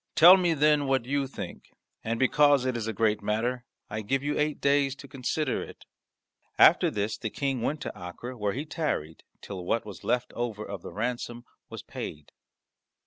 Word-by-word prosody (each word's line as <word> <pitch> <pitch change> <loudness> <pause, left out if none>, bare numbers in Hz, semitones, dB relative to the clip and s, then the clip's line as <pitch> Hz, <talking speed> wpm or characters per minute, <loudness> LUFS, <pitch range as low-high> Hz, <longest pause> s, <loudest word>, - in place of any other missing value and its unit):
Tell 175 +4 +10
me, 175 -3 +2
then, 150 -1 +3
what 135 -3 +1
you 140 +1 0
think. - - -8 0.3
And 115 +1 -2
because 145 0 +4
it 130 -1 0
is 115 -2 -3
a - - 0
great 110 0 +1
matter, 120 +4 -1 0.2
I 110 - -4
give 135 +6 -1
you 145 +1 -1
eight 150 0 0
days 140 -1 +2
to 140 +1 -12
consider 140 +4 -2
it." - - -10 0.7
After - - +7
this 105 +1 -2
the 110 - -3
King 135 +1 -2
went 150 +5 -1
to - - -4
Acre, 90 +8 -7
where 105 -3 -1
he 140 +5 -4
tarried 150 - -3 0.2
till 95 -3 -7
what 115 +6 0
was 100 -4 -10
left 125 0 -1
over 110 -3 -3
of 100 -3 -6
the - - -8
ransom 120 +1 -4 0.2
was - - -8
paid. 75 -1 -7
125 Hz, 190 wpm, -28 LUFS, 110-140 Hz, 0.7 s, Tell